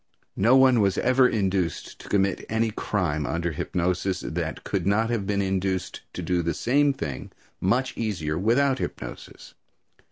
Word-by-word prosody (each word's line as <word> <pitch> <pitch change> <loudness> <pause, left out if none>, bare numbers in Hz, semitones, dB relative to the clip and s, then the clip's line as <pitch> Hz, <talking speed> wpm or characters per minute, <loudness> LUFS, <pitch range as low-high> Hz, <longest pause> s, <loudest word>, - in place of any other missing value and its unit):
No 115 +6 +6
one 130 -2 +6
was 100 -2 +2
ever 130 0 +4
induced 95 -6 -1
to - - -11
commit 100 -1 +1
any 110 0 +1
crime 80 -9 -1
under 85 0 -1
hypnosis, 90 +4 -1
that 80 -1 -4
could - - -2
not 110 +3 +2
have 105 -5 -1
been 100 -1 +1
induced 95 -1 -2
to - - -5
do 90 -1 +1
the 85 0 -2
same 145 +3 +3
thing 75 - -5 0.3
much 125 +8 0
easier 90 -9 -2
without 125 - +2
hypnosis. - - -7
100 Hz, 155 wpm, -25 LUFS, 90-115 Hz, 0.3 s, No